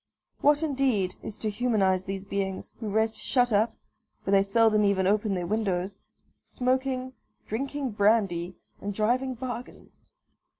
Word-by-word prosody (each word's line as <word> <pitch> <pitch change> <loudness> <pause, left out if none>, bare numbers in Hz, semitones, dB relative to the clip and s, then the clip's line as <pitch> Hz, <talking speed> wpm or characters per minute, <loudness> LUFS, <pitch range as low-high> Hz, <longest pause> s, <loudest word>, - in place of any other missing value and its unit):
What, 295 +2 +4
indeed, 260 -11 +1
is 215 - -5
to 215 - -2
humanise 200 -5 +1
these 195 0 -5
beings, 195 -1 -3
who 220 -3 -4
rest 220 +1 +1
shut 245 -1 +1
up 220 +2 +2 0.5
(for 195 - 0
they 195 -1 +6
seldom 215 +1 +3
even 200 -2 +2
open 205 +1 +2
their 175 -1 -2
windows), 195 -2 -1 0.4
smoking, 260 0 -1 0.3
drinking 270 +3 -3
brandy, 200 -4 +2 0.2
and 200 0 -4
driving 250 +5 +1
bargains? 245 0 -8
215 Hz, 135 wpm, -27 LUFS, 195-250 Hz, 0.5 s, they